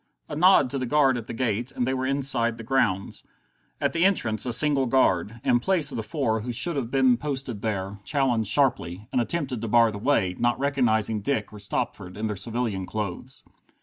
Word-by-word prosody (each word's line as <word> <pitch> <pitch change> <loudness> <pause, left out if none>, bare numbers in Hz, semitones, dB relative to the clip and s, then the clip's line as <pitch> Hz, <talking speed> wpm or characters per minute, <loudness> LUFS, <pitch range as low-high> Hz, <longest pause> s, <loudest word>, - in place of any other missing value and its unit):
A 150 - -6
nod 165 -5 +5
to 140 - -2
the 130 - -3
guard 135 -1 +3
at 120 -2 -6
the - - -6
gate, 120 +1 -2
and 125 - -2
they 130 - -1
were 130 0 -2
inside 130 -4 0
the 115 - -8
grounds. 110 -6 0 0.6
At - - 0
the 165 0 +1
entrance 125 - +2
a - - -1
single 135 +1 +3
guard, 115 -4 +1
in 120 - +3
place 175 +3 +2
of - - -6
the 115 - -2
four 110 0 -1
who 120 +3 -5
should 165 +8 +1
have 130 -5 -2
been 130 -2 +3
posted 135 -6 -4
there, 100 -2 -3
challenged 125 -7 0
sharply, 110 - 0
and 125 - +1
attempted 130 -3 -3
to 115 - -3
bar 115 0 +4
the 100 - -7
way, 100 -7 +1
not 120 0 +1
recognizing 115 -6 +1
Dick 110 -2 -2
or 105 - -10
Stopford 100 -2 -3
in 110 - -3
their 105 -1 -2
civilian 110 -2 -3
clothes. 105 -5 -5
120 Hz, 210 wpm, -25 LUFS, 110-135 Hz, 0.6 s, nod